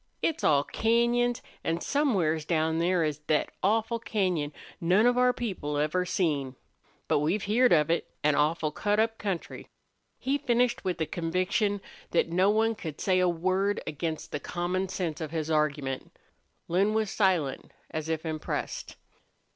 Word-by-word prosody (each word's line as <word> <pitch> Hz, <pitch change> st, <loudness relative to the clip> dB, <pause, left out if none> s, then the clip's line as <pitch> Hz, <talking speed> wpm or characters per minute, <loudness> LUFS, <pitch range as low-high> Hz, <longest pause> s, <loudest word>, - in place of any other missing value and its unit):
It's 320 Hz, -1 st, 0 dB
all 140 Hz, -2 st, +4 dB
cañons, 235 Hz, +3 st, +1 dB, 0.2 s
an' 165 Hz, +1 st, 0 dB
somewheres 185 Hz, -, +1 dB
down 160 Hz, 0 st, +1 dB
there 175 Hz, 0 st, +2 dB
is 150 Hz, -2 st, -1 dB
thet 150 Hz, 0 st, 0 dB
awful 225 Hz, +3 st, +1 dB
cañon 180 Hz, -10 st, -1 dB, 0.3 s
none 185 Hz, +6 st, +4 dB
of 245 Hz, 0 st, +4 dB
our 250 Hz, 0 st, +4 dB
people 185 Hz, -12 st, -3 dB
ever 155 Hz, +5 st, 0 dB
seen. 145 Hz, -9 st, 0 dB, 0.5 s
But -, -, +3 dB
we've 170 Hz, +8 st, 0 dB
heerd 240 Hz, +5 st, +3 dB
of 155 Hz, -1 st, +4 dB
it. 170 Hz, -, 0 dB
An 150 Hz, 0 st, +4 dB
awful 155 Hz, +1 st, +1 dB
cut 205 Hz, +6 st, 0 dB
up 225 Hz, 0 st, +1 dB
country." 195 Hz, -5 st, -4 dB, 0.5 s
He 275 Hz, +2 st, -1 dB
finished 245 Hz, -1 st, +1 dB
with 180 Hz, -2 st, -2 dB
a -, -, +2 dB
conviction 185 Hz, +5 st, 0 dB, 0.3 s
that 170 Hz, -, +2 dB
no 185 Hz, +4 st, +3 dB
one 220 Hz, +2 st, +3 dB
could 160 Hz, -8 st, -7 dB
say 185 Hz, -1 st, +2 dB
a 180 Hz, -1 st, +3 dB
word 185 Hz, +4 st, 0 dB
against 155 Hz, +1 st, -4 dB
the -, -, -2 dB
common 180 Hz, +4 st, -2 dB
sense 175 Hz, -5 st, -3 dB
of 155 Hz, -, -3 dB
his 160 Hz, 0 st, -3 dB
argument. 145 Hz, -4 st, -1 dB, 0.5 s
Lin 195 Hz, +5 st, +2 dB
was 220 Hz, -2 st, 0 dB
silent, 180 Hz, -9 st, +1 dB, 0.2 s
as 155 Hz, 0 st, -4 dB
if 160 Hz, 0 st, -2 dB
impressed. 155 Hz, -1 st, -4 dB
180 Hz, 160 wpm, -28 LUFS, 155-215 Hz, 0.5 s, all